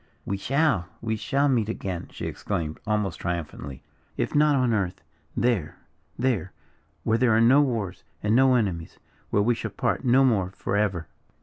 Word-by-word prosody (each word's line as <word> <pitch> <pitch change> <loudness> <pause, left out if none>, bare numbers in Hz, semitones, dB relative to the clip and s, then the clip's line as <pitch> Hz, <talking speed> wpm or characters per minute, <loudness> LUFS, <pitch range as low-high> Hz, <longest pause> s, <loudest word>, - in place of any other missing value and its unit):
"We 100 - -1
shall 135 - +1
we 110 -1 -2
shall 140 +6 +1
meet 115 -6 +1
again!" 95 -5 -4
she - - -6
exclaimed, 80 -6 -3
almost 105 -5 0
triumphantly. 75 -6 -5 0.3
"If - - -1
not 150 0 +4
on 125 -3 +2
earth 95 -4 -1 0.3
there, 115 -11 0 0.4
there, 110 -9 0 0.5
where 115 +1 +2
there 120 -3 +4
are - - +4
no 125 +5 +6
wars, 110 -9 -2 0.2
and 105 +2 +2
no 130 0 +5
enemies 95 -8 -1 0.3
where 100 - +2
we 120 +3 +3
shall 115 -1 -4
part 100 - -1
no 130 +1 +5
more 100 -8 +2
forever!" 100 -4 -1
110 Hz, 165 wpm, -26 LUFS, 95-125 Hz, 0.5 s, no